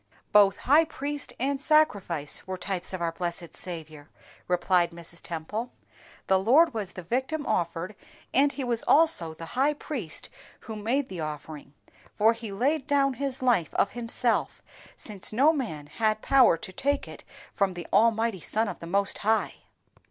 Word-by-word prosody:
"Both 200 -2 +6
high 300 +5 +6
priest 290 -2 -5
and 275 +2 -1
sacrifice 200 - +2
were 185 0 -4
types 185 0 -4
of 185 -2 -4
our 165 - 0
blessed 170 0 -5
Saviour," 155 -4 -7 0.4
replied 180 0 +2
Mrs. 170 0 -10
Temple. 210 +9 -5 0.5
"The 190 0 +3
Lord 280 - +5
was 205 -5 -4
the 185 - -8
victim 265 - -2
offered, 170 +3 -1 0.4
and 280 +2 +4
He 280 - -5
was 240 -2 0
also 290 - +4
the 165 - -8
high 280 +4 +2
priest 240 - -5 0.3
who 220 - -7
made 245 +6 -1
the 185 - -7
offering, 150 -2 -7 0.4
for 220 +2 +4
He 230 -2 -8
laid 270 +8 0
down 280 -2 +2
His 270 -1 -3
life 230 - +2
of 200 - +2
Himself, 240 0 0 0.3
since 205 -4 -2
no 275 +8 +4
man 190 - -4
had 215 +6 -1
power 265 -11 +5
to 185 +3 -9
take 285 +7 -1
it - - -11 0.3
from 195 -3 0
the 175 - -6
Almighty 225 -2 +3
Son 220 +7 -1
of - - -6
the 170 - -8
Most 200 +3 0
High." 220 +2 +1
215 Hz, 165 wpm, -27 LUFS, 175-265 Hz, 0.5 s, Both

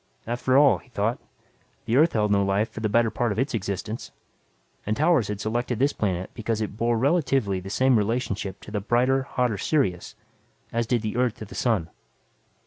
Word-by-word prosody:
After 125 +3 +1
all, 145 -1 +5
he - - -22
thought, 115 +1 -1 0.7
the 115 - 0
Earth 155 +5 +4
held 105 -2 +1
no 100 -1 +3
life 100 +3 0
for - - -7
the 110 -1 -1
better 115 +1 +3
part 120 -2 0
of 100 - -3
its 130 +3 0
existence. 105 +1 -4 0.7
And 110 +1 -2
Towers 155 - +3
had 105 -1 -4
selected 120 +3 -2
this 140 +5 +2
planet 95 -3 -2
because 115 -1 -2
it 105 -2 -3
bore 115 +1 +1
relatively 135 - +1
the 95 +1 -8
same 130 +5 +3
relationship 105 -3 -2
to - - -11
the 105 -1 -2
brighter, 125 +5 +2
hotter 125 -5 -1
Sirius 110 - 0 0.6
as 115 0 0
did 120 -2 0
the 110 +2 -3
Earth 125 -3 +1
to 110 - -8
the 100 - -12
sun. 105 -10 0
115 Hz, 195 wpm, -25 LUFS, 105-125 Hz, 0.7 s, all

